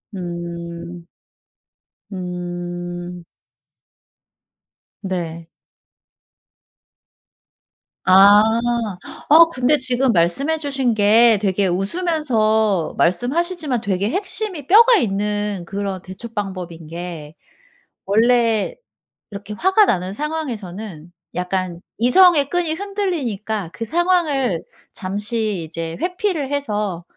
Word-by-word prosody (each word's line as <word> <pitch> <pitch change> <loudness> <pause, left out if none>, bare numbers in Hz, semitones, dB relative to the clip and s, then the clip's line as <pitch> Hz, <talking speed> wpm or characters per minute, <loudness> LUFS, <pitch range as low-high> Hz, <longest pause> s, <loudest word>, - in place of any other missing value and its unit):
음. 170 -1 -7 1.1
음. 175 -1 -6 1.8
네. 170 -4 -5 2.6
아. 200 +2 +7 0.9
아! 325 +3 +8
근데 255 +4 +4
지금 255 -1 +2
말씀해주신 270 - +1
게 220 +2 +5
되게 195 -1 +1
웃으면서 220 - 0
말씀하시지만 280 - 0
되게 195 +1 -1
핵심이 380 - -1
뼈가 465 +5 +7
있는 205 - -1
그런 195 0 -4
대처 190 +5 -7
방법인 180 -6 -6
게 165 -2 -8 0.7
원래 225 +1 +2 0.6
이렇게 200 +1 -8
화가 380 - +3
나는 185 - -1
상황에서는 215 - -5 0.2
약간 180 -1 -3 0.2
이성의 285 - +5
끈이 350 -3 0
흔들리니까 285 - -3
그 230 - -5
상황을 300 - +1 0.3
잠시 205 0 -2
이제 165 +1 -6
회피를 355 -6 -1
해서 210 -11 -2
210 Hz, 185 characters per minute, -20 LUFS, 180-285 Hz, 2.6 s, 아